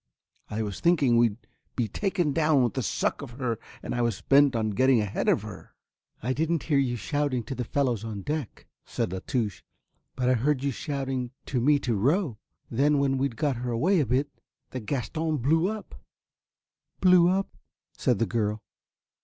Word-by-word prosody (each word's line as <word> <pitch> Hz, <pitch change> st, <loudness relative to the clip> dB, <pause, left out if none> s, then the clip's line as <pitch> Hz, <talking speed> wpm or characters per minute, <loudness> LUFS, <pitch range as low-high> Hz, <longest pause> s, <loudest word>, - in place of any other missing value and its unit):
I 110 Hz, +1 st, -2 dB
was 100 Hz, -2 st, -5 dB
thinking 145 Hz, -8 st, +3 dB
we'd 115 Hz, -3 st, +3 dB, 0.4 s
be 120 Hz, -3 st, 0 dB
taken 180 Hz, -, -1 dB
down 150 Hz, -4 st, +3 dB
with 120 Hz, -, 0 dB
the 130 Hz, -, -1 dB
suck 100 Hz, -, -1 dB
of 120 Hz, -, -8 dB
her 120 Hz, -3 st, -2 dB, 0.2 s
and -, -, -4 dB
I 120 Hz, -, 0 dB
was 115 Hz, -5 st, 0 dB
bent 140 Hz, -1 st, +4 dB
on 110 Hz, -1 st, 0 dB
getting 130 Hz, +3 st, +4 dB
ahead 105 Hz, -2 st, -1 dB
of -, -, +2 dB
her." -, -, -10 dB, 0.5 s
"I 130 Hz, +3 st, 0 dB
didn't 160 Hz, +2 st, 0 dB
hear 145 Hz, -3 st, +2 dB
you 125 Hz, -3 st, +1 dB
shouting 145 Hz, 0 st, -1 dB
to 125 Hz, -, -5 dB
the 125 Hz, -1 st, -3 dB
fellows 120 Hz, -3 st, 0 dB
on 105 Hz, -3 st, -5 dB
deck," 150 Hz, -3 st, -4 dB, 0.2 s
said 90 Hz, -, -3 dB
La 95 Hz, -, -3 dB
Touche, 110 Hz, -3 st, -2 dB, 0.5 s
"but 125 Hz, -, -1 dB
I 130 Hz, -, +5 dB
heard 130 Hz, +3 st, +1 dB
you 140 Hz, -, +1 dB
shouting 135 Hz, -2 st, -3 dB, 0.2 s
to 125 Hz, -3 st, -1 dB
me 145 Hz, +4 st, +4 dB
to 120 Hz, -, 0 dB
row. 130 Hz, -, +1 dB, 0.3 s
Then 145 Hz, +5 st, +2 dB
when 135 Hz, -1 st, +1 dB
we'd 135 Hz, -3 st, -1 dB
got 135 Hz, +1 st, 0 dB
her 125 Hz, +1 st, -3 dB
away 165 Hz, +11 st, +2 dB
a 145 Hz, -, +1 dB
bit 135 Hz, +5 st, +1 dB, 0.4 s
the 130 Hz, -, -4 dB
Gaston 150 Hz, +6 st, -2 dB
blew 160 Hz, +7 st, +2 dB
up." 215 Hz, 0 st, -5 dB, 1.1 s
"Blew 180 Hz, -2 st, +6 dB
up," 195 Hz, +1 st, -1 dB, 0.4 s
said 125 Hz, -, +1 dB
the 115 Hz, -, +1 dB
girl. 110 Hz, -2 st, -1 dB
130 Hz, 185 wpm, -27 LUFS, 115-150 Hz, 1.1 s, Blew